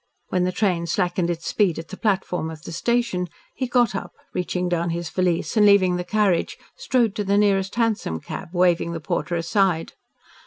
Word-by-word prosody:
When 180 -1 +1
the 185 - 0
train 180 -3 0
slackened 175 0 0
its 170 -1 -3
speed 195 -6 +1
at 165 - -7
the - - -6
platform 190 -6 -1
of 155 -2 -9
the - - -7
station, 235 -1 0 0.3
he 260 - -3
got 240 -4 +2
up, 195 - -5 0.2
reaching 180 0 -1
down 175 -1 0
his 170 -1 -3
valise 180 +1 0
and 215 - +5
leaving 190 -3 +5
the 180 - -2
carriage, 195 -1 +1 0.2
strode 250 - +1
to 210 - 0
the 200 0 +2
nearest 195 -1 +2
hansom 220 - 0
cab, - - -7
waving 175 -2 +2
the 165 - -4
porter 155 +2 -2
aside. 170 0 +1
180 Hz, 190 wpm, -23 LUFS, 170-205 Hz, 0.3 s, and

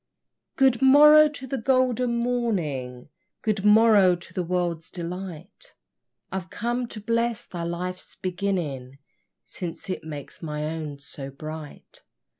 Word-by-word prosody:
Good 265 -2 +3
morrow 300 +3 +8
to 285 -3 -8
the 265 +1 -3
golden 250 -1 +1
morning, 170 - -2 0.3
Good 210 -3 0
morrow 210 -3 +6
to 175 - -13
the 185 - -1
world's 175 -2 -2
delight 180 - -8 0.6
I've 185 -1 -4
come 240 +2 -2
to 220 - -8
bless 230 +2 -1
thy 175 - -7
life's 180 +2 -4
beginning, 175 -9 -3 0.5
Since 180 +1 -5
it - - -4
makes 150 -3 -7
my 150 -2 -3
own 155 -2 -4
so 140 0 -7
bright! 155 +2 -9
185 Hz, 125 wpm, -25 LUFS, 160-235 Hz, 0.6 s, morrow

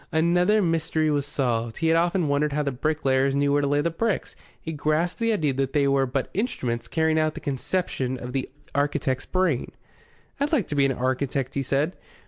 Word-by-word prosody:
Another 175 +6 +3
mystery 160 -2 +1
was 145 -1 0
solved. 120 -5 -1
He 160 0 +1
had 165 - +4
often 175 0 +2
wondered 145 +1 +1
how 150 +1 0
the 140 - -1
bricklayers 135 -1 +1
knew 140 0 +2
where 145 - +3
to 140 - 0
lay 145 +1 +2
the 170 - 0
bricks. 215 +5 -2 0.2
He 160 - -6
grasped 155 +5 0
the 230 0 +2
idea 155 -10 +1
that 135 0 -1
they 145 -2 +3
were 135 -1 +2
but 130 +1 -2
instruments 120 - -2
carrying 160 +1 +1
out 155 0 +1
the - - -5
conception 135 -2 -2
of 125 0 -7
the 135 -1 -2 0.2
architect's 140 -2 0
brain. 185 -9 0 0.7
"I'd 285 +1 0
like 250 - +2
to 150 - -2
be 140 -1 +4
an - - 0
architect," 130 +1 -1
he 140 - -1
said. 140 +6 0
145 Hz, 205 wpm, -25 LUFS, 135-165 Hz, 0.7 s, had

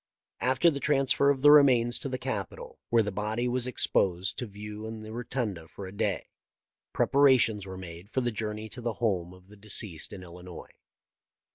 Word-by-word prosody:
After 130 +6 +3
the 140 - -4
transfer 140 -1 +2
of 135 -1 0
the 145 - +9
remains 125 -5 +5
to 135 - -4
the 130 - -3
Capitol, 110 -9 -5
where 115 -1 +4
the 105 - -3
body 110 +5 -2
was 125 0 -1
ex 125 - +1
posed 90 0 +1
to 125 - -4
view 105 +1 -8
in 110 -1 -7
the 110 - -9
Rotunda 115 -8 -4
for 100 - -9
a 95 - -8
day, 100 -1 -2 0.7
preparations 125 -8 +3
were 95 0 -7
made 90 +1 -10
for 130 - -1
the 120 -1 -1
journey 110 0 -4
to 125 - -8
the 120 -1 -2
home 95 -7 -1
of 90 0 -17
the 105 +1 -15
de 105 +2 -15
ceased 90 -6 0
in 95 - -9
Illinois. 90 0 -11
110 Hz, 195 wpm, -28 LUFS, 95-125 Hz, 0.7 s, the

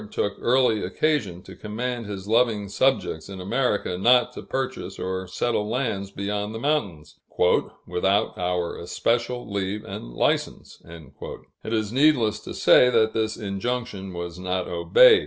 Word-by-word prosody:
took 100 - -1
early 120 -3 +3
occasion 110 - -1
to 95 - -11
command 115 +4 -4
his 100 -1 -6
"loving 110 -2 +2
subjects" 100 -7 0
in 95 -1 -7
America 100 -2 -1
not 125 +3 +4
to - - -7
purchase 130 0 -4
or 95 0 -3
settle 105 +2 -1
lands 110 -6 -2
beyond 105 +2 -3
the - - -4
mountains, 110 - -2 0.7
"without 95 +3 +1
our 90 -1 -1
especial 120 +7 -1
leave 100 0 -3
and - - -7
license." - - -1
It 85 +6 -10
is 110 -1 -1
needless 130 -6 +3
to - - -8
say 125 - +6
that 110 -2 +3
this 110 -1 -1
injunction 100 -1 -3
was 85 0 -6
not 90 0 -2
obeyed. 440 - +6
105 Hz, 140 wpm, -24 LUFS, 95-120 Hz, 0.7 s, say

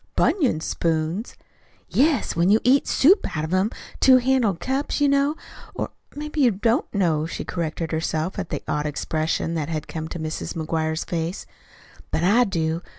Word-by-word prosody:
"BUNION 275 - +2
spoons!" 165 +7 -2 0.5
"Yes 290 +2 +2
when 170 +2 +3
you 215 +2 +5
eat 265 +4 +4
soup 355 - +3
out 155 - -1
of 160 - -4
them 185 +3 +2 0.3
two 260 -1 +7
handled 245 -8 +2
cups, 270 +9 -1
you 290 - +4
know. 280 +2 +2 0.4
Or - - -3 0.2
maybe 300 +1 -3
you 255 - +6
don't 225 +3 0
know," 165 -6 +1
she - - -5
corrected 165 -1 -3
herself, 160 +3 -2
at 185 - -4
the - - -4
odd 150 0 -1
expression 155 +2 -1
that 160 -2 -2
had 155 -2 -3
come 160 -1 -5
to 170 - -6
Mrs. 155 -1 -4
McGuire's 160 0 -1
face. 170 +2 -3 0.6
"But 160 - -1
I 225 +7 +5
do. 165 -4 -1
175 Hz, 170 wpm, -23 LUFS, 160-255 Hz, 0.6 s, two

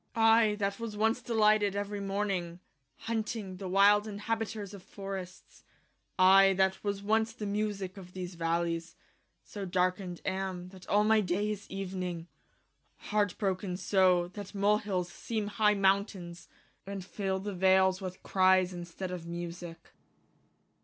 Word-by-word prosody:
I 225 -1 +5
that 200 0 -2
was 225 -2 -5
once 225 +3 +2
delighted 215 -3 +3
every 205 0 -3
morning 195 -3 -2
y - - -14 0.5
Hunting 220 -4 -3
the 190 0 -6
wilde 205 +2 +5
inhabiters 210 -1 -3
of 200 - -9
forrests 190 -2 -8 0.5
y 190 +1 +7
I 195 - +3
that 190 0 +1
was 200 -1 -2
once 220 +2 +1
the 220 -3 -6
musique 200 -2 -2
of 180 -2 -11
these 185 -1 -6
v 170 -1 -8
allies 165 0 -1
y - - -37 0.4
So 205 -2 -7
darkened 180 0 -1
am 190 -1 -2
y 180 - -11
that 185 -1 -14
all 205 +1 +4
my 220 0 +4
day 200 +3 0
is 205 -1 -7
evening 185 -2 -4
y 165 - -10 0.8
Hart 205 -3 +1
broken 185 -2 -2
so 185 -2 +3
y 175 - -8
that 205 0 -8
molehilles 200 -3 +1
seeme 215 -3 -3
high 210 0 +3
mount 195 +1 +2
aines 175 -2 -10 0.4
y 200 - -5
And 190 -2 -6
fill 195 -1 -2
the 200 +1 -5
vales 190 +1 +3
with 185 -1 -7
cries 185 -1 +3
in 175 -1 -6
steed 180 +2 -6
of 175 -2 -6
musique 170 0 -7
195 Hz, 165 wpm, -31 LUFS, 185-210 Hz, 0.8 s, y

